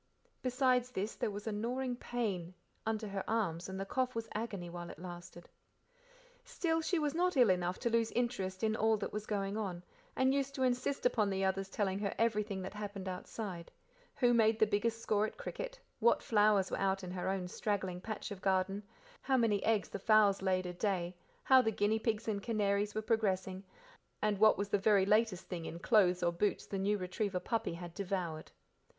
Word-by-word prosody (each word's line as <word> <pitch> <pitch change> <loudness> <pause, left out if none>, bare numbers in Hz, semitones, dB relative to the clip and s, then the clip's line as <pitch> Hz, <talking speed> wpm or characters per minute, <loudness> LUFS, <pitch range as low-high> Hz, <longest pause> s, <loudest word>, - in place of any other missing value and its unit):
Besides 255 -1 +2
this, 210 -2 -3
there - - -2
was 205 0 -6
a 220 - -1
gnawing 245 +4 -2
pain, 200 -8 -3 0.3
under 220 -1 -1
her 195 -1 -3
arms, 190 -6 -1
and 190 0 -5
the 195 - -2
cough 255 +4 -1
was 230 0 -3
agony 210 -5 -4
while 175 0 -7
it - - -9
lasted. 175 0 -9 1.0
Still, 325 -8 0
she 350 +3 0
was 300 -2 0
not 360 -1 +1
ill 240 -6 +6
enough 180 0 0
to 235 - +1
lose 230 -1 +2
interest 195 -6 -1
in 220 0 +2
all 220 0 +3
that - - -5
was 210 0 -4
going 200 0 -1
on, 185 -5 -3 0.3
and 260 +1 +3
used 275 0 -1
to 265 - 0
insist 255 +2 0
upon 210 -4 +3
the 195 0 0
others 195 0 -1
telling 195 -2 -1
her 200 -2 -2
everything 210 -4 0
that 190 - -6
happened 205 -2 -6
outside 185 -1 -5 0.5
who 245 -2 +3
made 220 -1 +4
the 220 - +5
biggest 220 +2 0
score 215 0 +2
at - - -11
cricket, - - -6 0.2
what 235 +1 +4
flowers 205 -3 +3
were - - -1
out 195 0 +1
in 180 - -5
her 185 0 -2
own 190 -2 -1
straggling 190 -2 -2
patch 215 +1 -5
of 195 -2 -7
garden, 195 +1 +1 0.4
how 265 -1 +2
many 215 -5 +2
eggs 220 -2 +1
the 200 - -5
fowls 210 -2 +4
laid 185 -1 +1
a 180 - -4
day, 180 -2 -1 0.3
how 260 -1 +7
the 220 - +1
guinea 215 +1 +1
pigs 220 -1 -1
and 205 -2 -1
canaries 205 -2 0
were 215 - -1
progressing, 195 -4 0 0.6
and 210 -2 0
what 215 0 +6
was 200 0 -2
the 205 - +2
very 195 -1 +4
latest 210 -2 +2
thing 170 -3 -5
in 165 - -6
clothes 180 -2 +3
or 170 - +3
boots 200 +4 0
the 195 - -4
new 205 +2 +1
retriever 185 +1 -2
puppy 220 -2 -2
had 175 0 -8
devoured. 180 -5 -3
205 Hz, 200 wpm, -34 LUFS, 190-225 Hz, 1.0 s, how